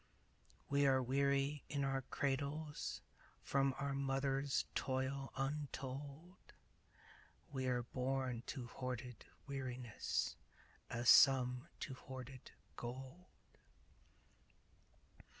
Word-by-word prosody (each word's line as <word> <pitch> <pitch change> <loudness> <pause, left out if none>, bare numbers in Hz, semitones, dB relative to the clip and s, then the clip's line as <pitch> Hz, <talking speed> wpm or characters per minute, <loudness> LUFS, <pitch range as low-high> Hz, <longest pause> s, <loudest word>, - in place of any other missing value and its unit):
We 140 0 +4
are 130 -1 +5
weary 140 +2 +2
in 140 -1 0
our 135 -1 +1
cradles 140 +3 -2 0.4
From 135 -1 +2
our 140 0 -1
mother's 135 0 +1
toil 135 +1 -1
untold; 140 +4 -4 1.1
We 130 -2 -1
are 125 -1 +1
born 130 0 -1
to 130 -4 -4
hoarded 125 -1 -5 0.2
weariness 130 -4 -2 0.5
As 120 +1 -2
some 125 -2 +7
to 135 - -3
hoarded 130 0 -8 0.3
gold. 130 +8 -6
135 Hz, 85 wpm, -40 LUFS, 130-140 Hz, 1.1 s, some